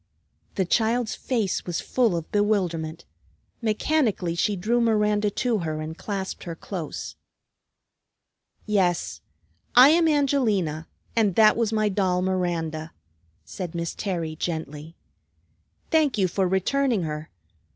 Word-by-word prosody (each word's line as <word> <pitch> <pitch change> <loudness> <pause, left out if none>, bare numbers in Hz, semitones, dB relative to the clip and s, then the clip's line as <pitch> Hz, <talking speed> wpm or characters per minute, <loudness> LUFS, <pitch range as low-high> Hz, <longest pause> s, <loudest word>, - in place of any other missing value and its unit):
the 190 - +1
child's 225 +4 +1
face 225 -7 -1
was 175 -2 -2
full 235 -8 +1
of 165 -1 -5
bewilderment. 175 -6 0 0.6
Mechanically 220 - +1
she 200 +4 0
drew 225 +6 +1
Miranda 210 -2 +2
to 230 +2 0
her 155 -3 -3
and 155 +1 -5
clasped 195 +1 -5
her 170 -2 -5
close. 170 -1 -6 1.5
"Yes, 190 -5 0 0.5
I 255 +3 +9
am 330 +1 +4
Angelina, 225 - +1 0.3
and 210 -6 +2
that 215 -1 +6
was 230 -2 0
my 215 -1 +1
doll 185 -2 +1
Miranda," 165 -4 -2 0.5
said 180 -3 -6
Miss 170 -1 -2
Terry 170 -6 -3
gently. 160 -1 -5 1.0
"Thank 310 -7 +3
you 190 -2 +3
for 185 +2 0
returning 215 +4 +1
her. 155 -1 -5
195 Hz, 120 wpm, -25 LUFS, 170-225 Hz, 1.5 s, I